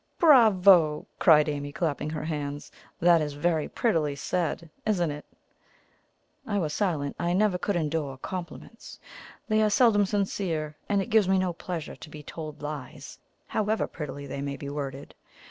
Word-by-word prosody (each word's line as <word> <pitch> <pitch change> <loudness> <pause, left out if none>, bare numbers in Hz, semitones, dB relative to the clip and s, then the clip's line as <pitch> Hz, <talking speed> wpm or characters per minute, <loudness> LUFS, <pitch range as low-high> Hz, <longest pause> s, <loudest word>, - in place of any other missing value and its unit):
"Bravo!" 195 - +6
cried 150 -2 +6
Amy, 145 -1 -3
clapping 150 -2 -2
her 155 -1 -4
hands. 145 -2 -4 0.3
"That 170 -1 +5
is 150 -1 -3
very 160 +1 0
prettily 160 -11 0
said, 170 +2 -2 0.2
isn't 175 -7 +1
it?" 150 0 -8 1.2
I 205 -2 -1
was 155 -6 -1
silent. 155 -9 -1
I 175 0 0
never 195 -1 +2
could 205 - -1
endure 155 -4 -2
compliments. 185 - -8 0.5
They 215 -1 +2
are 215 - +3
seldom 205 -2 +4
sincere, 180 -7 -2
and 200 -1 +2
it 240 - -10
gives 215 -4 +4
me 190 - +4
no 185 -2 0
pleasure 170 -2 -6
to - - -12
be 150 -1 -10
told 155 -1 -8
lies, 145 -3 -7 0.3
however 215 +1 0
prettily 145 -2 -7
they 140 0 -5
may 140 0 -4
be 140 - -6
worded. 140 -1 -6
165 Hz, 160 wpm, -27 LUFS, 150-195 Hz, 1.2 s, Bravo